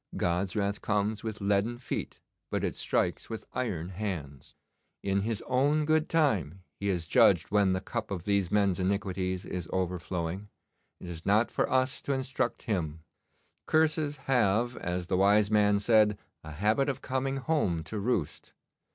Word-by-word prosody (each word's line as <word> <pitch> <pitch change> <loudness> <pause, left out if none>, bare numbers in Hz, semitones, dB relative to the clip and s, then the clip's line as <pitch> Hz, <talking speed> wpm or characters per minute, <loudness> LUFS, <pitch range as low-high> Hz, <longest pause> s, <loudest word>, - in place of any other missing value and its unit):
God's 90 +2 0
wrath 100 -1 -1
comes 105 0 0
with 110 -1 -5
leaden 100 +4 +1
feet, 125 - -5 0.3
but - - -2
it - - -1
strikes - - -1
with 110 -1 -6
iron 90 -9 -2
hands. 85 -9 -6 0.5
In 100 0 +1
His 110 +2 -2
own 145 +4 +2
good 155 +1 +2
time 95 - +1 0.2
He 100 - -2
has 90 -4 0
judged - - +4
when 100 -2 +3
the 95 - -1
cup - - -4
of 90 -4 -4
these 100 -3 +1
men's 100 -3 +2
iniquities 95 -1 -1
is 90 -3 -5
overflowing. 90 +1 -3 0.5
It - - -9
is 85 -1 -7
not 110 +4 +3
for - - 0
us 130 +1 +1
to 140 - -1
instruct 130 -1 -2
Him. 80 -8 -2 0.7
Curses 155 -2 +2
have, 120 -1 +2
as 90 0 -3
the 90 +1 0
wise 100 +2 +4
man 105 -1 +4
said, 105 -1 +4 0.3
a 80 -1 -8
habit 110 - +1
of 135 - -4
coming 135 +1 -1
home 130 - 0
to 105 +8 -5
roost. 100 - -2
100 Hz, 160 wpm, -29 LUFS, 90-120 Hz, 0.7 s, judged